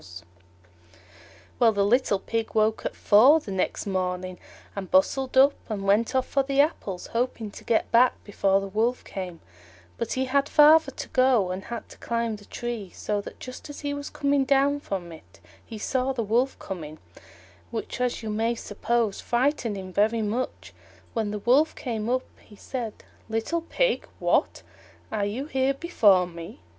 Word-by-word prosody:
Well, 235 -2 +6
the 200 -1 +2
little 230 -1 +3
Pig 225 +3 -3
woke 215 0 +2
at - - -8
four 255 +10 +6
the 215 - -8
next 190 -1 -1
morning, 185 -1 -2 0.4
and 195 -2 -5
bustled 270 -2 +2
up, 275 +2 +7 0.2
and 205 -3 -3
went 215 +6 +2
off 260 - +2
for 275 - +1
the 275 0 -1
apples, 210 - 0
hoping 230 -3 -2
to - - -12
get 230 - +1
back 245 +2 +5
before 195 -1 +1
the 195 - -5
Wolf 225 +5 0
came; 180 -3 -7 0.6
but - - -2
he 260 0 0
had 280 +2 +1
farther 305 0 +6
to - - -7
go, 255 -8 +3
and 185 +2 -5
had 235 -1 -6
to - - -14
climb 230 -2 -2
the 205 - -16
tree, 235 -5 -5
so 205 -1 -2
that - - -11
just 255 +4 -9
as 290 - -8
he 285 -1 -2
was 285 0 -5
coming 280 -1 +1
down 280 +1 +2
from 190 -10 -5
it, 90 - -15 0.2
he 225 - -9
saw 260 +4 -1
the 235 -3 -2
Wolf 240 +6 +1
coming, 155 -5 -7 0.7
which, 230 +2 -5
as 245 -2 -1
you 215 - -3
may 225 +2 0
suppose, 225 -1 -1
frightened 240 -3 0
him 185 -1 -8
very 220 +3 +2
much. 230 +5 -3 0.4
When 220 -2 -1
the 210 - -3
Wolf 260 +9 +3
came 230 -5 -3
up 255 +1 0 0.2
he 210 - -16
said, 230 0 -6 0.3
"Little 225 +10 -1
Pig, - - 0
what! - - +1 0.5
are 210 -2 0
you 240 +7 -4
here 265 -2 0
before 210 - +4
me? 170 - -10
230 Hz, 175 wpm, -26 LUFS, 200-265 Hz, 0.7 s, up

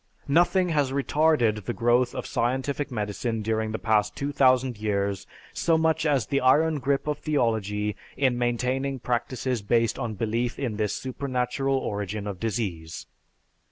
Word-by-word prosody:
_Nothing 175 +4 +3
has 145 -4 +1
retarded 140 - +2
the - - -3
growth 120 +1 +2
of - - -4
scientific 130 +4 -1
medicine 110 0 -3
during 110 0 -1
the 110 - -2
past 105 -2 +1
2000 130 -4 +2
years 100 -2 -1 0.3
so 165 -1 +2
much 160 0 +1
as 140 -7 +2
the 140 +4 0
iron 150 +4 +4
grip 135 +1 0
of 150 -1 -2
theology 110 -7 0 0.2
in 130 -2 +2
maintaining 125 +3 -1
practices 125 0 -2
based 115 +4 +1
on 115 -4 -3
belief 115 +4 -1
in 120 -7 -3
this 105 -2 0
supernatural 130 0 -1
origin 105 -3 -3
of 100 -3 -5
disease. 95 -8 -3
120 Hz, 145 wpm, -26 LUFS, 110-140 Hz, 0.3 s, iron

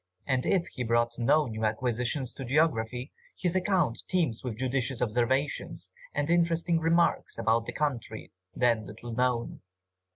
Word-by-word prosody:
And 130 -2 0
if 180 -3 +2
he 125 - -5
brought 120 0 +1
no 150 +6 +4
new 110 -3 -5
acquisition 120 +4 0
to 135 - -6
geography, 125 -2 +1 0.3
his 180 -1 -1
account 185 - +1
teams 165 -12 0
with 120 -4 -4
judicious 130 0 -1
observations, 125 +4 -1 0.2
and 145 - 0
interesting 170 0 +2
remarks 170 +1 +2
about 115 +1 +1
a - - -1
country 140 -6 -3 0.2
then 115 -4 +2
little 115 +3 -8
known. 125 -1 0
125 Hz, 140 wpm, -29 LUFS, 115-160 Hz, 0.3 s, no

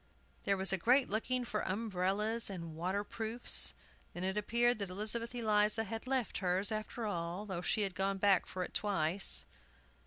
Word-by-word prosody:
There 200 0 +1
was 190 0 +3
a 190 - 0
great 250 +6 +3
looking 245 +3 -1
for 210 -2 -3
umbrellas 210 +2 -1
and 170 -4 -7
water 185 +5 -2
proofs. 225 +3 +4 0.4
Then 175 - -5
it 190 +1 -2
appeared 235 +3 +1
that 200 -2 -3
Elizabeth 220 +5 -2
Eliza 215 -1 +1
had 225 +3 -6
left 260 -3 -1
hers, 185 +2 0
after 215 +2 -4
all, 175 0 -4
though 185 -4 -4
she 215 - +1
had 195 -2 -1
gone 195 +1 -1
back 195 -1 +2
for 185 - -4
it - - -8
twice. 190 -2 +1
205 Hz, 175 wpm, -34 LUFS, 190-225 Hz, 0.4 s, proofs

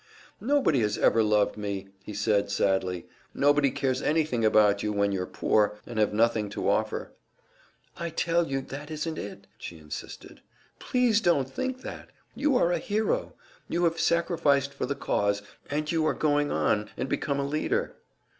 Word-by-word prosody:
"Nobody 265 - +2
has 105 -2 0
ever 115 - +4
loved 105 -1 +2
me," 100 -2 -4
he 95 - -9
said, 100 0 +1
sadly. 95 -3 0 0.3
"Nobody 145 0 +4
cares 130 -1 -1
anything 150 -7 +1
about 105 -2 +4
you, 105 - -1
when 100 -1 +1
you 95 -2 -1
are 90 - -4
poor, 105 -1 +1
and 115 -2 -5
have 105 - +3
nothing 110 -1 +2
to 105 - -3
offer - - 0 0.4
" - - -33
"I 170 0 -2
tell 170 +1 +1
you, 135 0 -1
that 145 +3 -8
isn't 155 +1 -3
it!" 100 - -8
she 85 - -8
insisted. 75 -1 -9 0.4
"Please 245 -4 +2
don't 165 - +2
think 255 - -4
that! - - -8 0.2
You 280 -2 +2
are 175 - +3
a - - +1
hero. 220 - -1 0.3
You 175 - 0
have 165 -1 +1
sacrificed 155 -5 +2
for 140 - -3
the 140 - -2
cause, 100 -6 0 0.3
and 150 +1 -1
you 165 -2 +1
are - - +1
going 145 -1 +1
on 105 0 +1
and - - -2
become 140 +1 -1
a 140 - 0
leader." 150 +2 -1
140 Hz, 175 wpm, -27 LUFS, 105-165 Hz, 0.4 s, ever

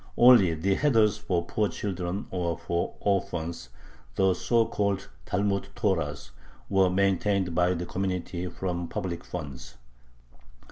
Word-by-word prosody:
Only 120 -9 +7
the 95 +5 +1
heders 110 -6 +3
for 90 -4 -1
poor 105 +3 0
children 95 -1 -3
or 85 -3 -1
for 85 0 -2
orphans, 85 -8 -1 0.5
the 95 -1 +3
so 115 +4 +2
called 100 -3 -1 0.2
Talmud 100 0 0
Torahs, 75 - -1 0.4
were 95 -1 +4
maintained 95 -1 +1
by 90 +1 +2
the 90 +1 -3
community 90 -1 -3
from 90 -1 -3
public 85 +1 -4
funds. 70 -6 -7
90 Hz, 125 wpm, -27 LUFS, 85-100 Hz, 0.5 s, Only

